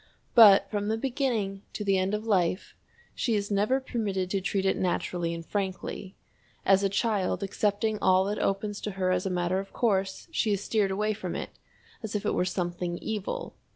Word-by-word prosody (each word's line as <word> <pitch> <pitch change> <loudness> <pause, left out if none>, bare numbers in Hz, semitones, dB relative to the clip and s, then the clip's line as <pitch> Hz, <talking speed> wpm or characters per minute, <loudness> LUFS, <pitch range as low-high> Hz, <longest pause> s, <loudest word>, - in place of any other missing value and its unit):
But 210 -5 +8
from 205 -1 -1
the 220 +1 0
beginning 235 -6 -1
to 210 - -4
the 195 -2 +2
end 190 +3 0
of 215 +1 -5
life 185 -3 +1 0.4
she 230 -3 0
is 205 0 -2
never 210 +7 +2
permitted 200 -8 -2
to 195 - 0
treat 195 +1 -1
it 190 - +3
naturally 175 -1 -1
and 165 0 -6
frankly. 195 0 -4 0.5
As 195 0 +5
a 200 - +2
child 200 -1 0
accepting 210 +2 0
all 185 0 +4
that 205 +1 -2
opens 200 +1 -1
to 210 - -3
her 185 -1 +1
as 185 +1 0
a - - -1
matter 180 +1 0
of 195 0 -8
course, 195 - 0
she 220 -9 +1
is 200 0 -2
steered 210 -3 +1
away 210 +3 0
from 185 -4 -5
it - - -5 0.5
as 220 -3 -5
if 210 - -2
it - - +1
were 180 - +1
something 175 -1 -2
evil. 220 - -4
195 Hz, 195 wpm, -28 LUFS, 185-215 Hz, 0.5 s, But